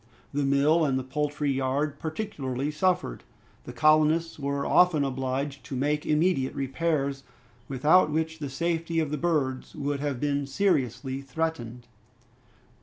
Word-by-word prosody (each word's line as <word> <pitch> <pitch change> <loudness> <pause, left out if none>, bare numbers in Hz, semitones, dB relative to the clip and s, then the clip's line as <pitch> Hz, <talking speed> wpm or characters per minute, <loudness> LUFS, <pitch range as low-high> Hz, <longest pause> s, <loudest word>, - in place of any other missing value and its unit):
The 145 - 0
mill 140 +4 +3
and 135 -3 +1
the 130 - -2
poultry 145 +2 -1
yard 135 +2 -1
particularly 150 - -3
suffered. 170 - 0 0.4
The - - -7
colonists 155 +1 +3
were 140 0 -2
often 180 -5 +4
obliged 135 +1 -3
to 135 - -5
make 150 +3 0
immediate 155 -3 +1
repairs, 140 0 -1 0.5
without 150 +7 +4
which 160 +1 -2
the 145 -2 -4
safety 165 +3 -1
of 155 -3 -1
the 150 - -1
birds 145 -6 -1
would 145 -1 -2
have 140 -3 -2
been 145 0 -1
seriously 135 - 0
threatened. 125 -4 -4
145 Hz, 135 wpm, -27 LUFS, 135-160 Hz, 0.5 s, often